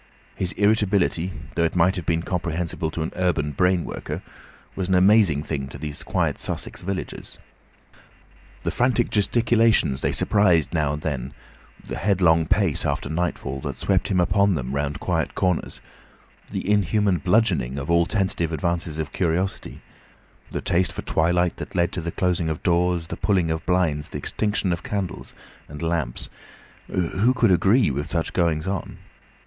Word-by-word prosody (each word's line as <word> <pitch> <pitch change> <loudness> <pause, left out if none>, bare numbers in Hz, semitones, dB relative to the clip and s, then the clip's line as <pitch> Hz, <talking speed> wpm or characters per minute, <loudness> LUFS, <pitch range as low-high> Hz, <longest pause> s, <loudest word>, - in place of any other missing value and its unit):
His 90 -1 -2
irritability, 100 -4 +2 0.2
though 85 - +1
it 85 - 0
might 90 +2 +3
have 90 -5 -5
been 85 0 +1
comprehensible 85 -2 -2
to 80 0 -3
an 80 - -4
urban 85 -5 0
brain 90 +4 +2
worker, - - -6 0.5
was 95 -1 -2
an 95 - +3
amazing 95 -5 +5
thing 70 -4 -3
to 70 - -9
these 75 0 -6
quiet - - -1
Sussex - - -4
villagers. 95 +1 -5 1.3
The - - -1
frantic 125 -1 +1
gesticulations 115 - +3
they - - +1
surprised 90 -7 +2
now 75 -3 +1
and 75 - -6
then, 70 -3 -3 0.5
the - - -5
headlong 85 -5 +3
pace 95 -5 +2
after 70 - -2
nightfall 80 -5 -2
that - - -5
swept - - +1
him 95 - +1
upon 100 +2 +3
them 65 -3 -3
round 70 +1 -2
quiet - - -1
corners, 90 -2 -1 0.7
the - - -4
inhuman 105 -2 +2
bludgeoning 90 - +1
of 70 +3 -3
all 85 0 +4
tentative 95 -6 0
advances 85 0 -2
of 80 -1 -3
curiosity, 90 +2 -2 0.7
the - - -4
taste 90 +2 +1
for - - -6
twilight 90 +2 +1
that - - -8
led 85 0 +2
to 90 - -4
the 85 - -3
closing 90 -3 0
of 80 - -4
doors, 90 -1 +2
the 80 - -6
pulling 95 -5 +1
down - - +2
of 80 - -16
blinds, 85 -5 +1
the - - -5
extinction 105 -4 -1
of 85 - -4
candles 95 -3 -4 0.3
and 75 +2 -7
lamps—who 85 - -2
could 115 -5 +3
agree 100 - +4
with 70 +3 -3
such 80 -1 -1
goings 85 -3 +1
on? 95 -1 -4
85 Hz, 165 wpm, -23 LUFS, 80-95 Hz, 1.3 s, amazing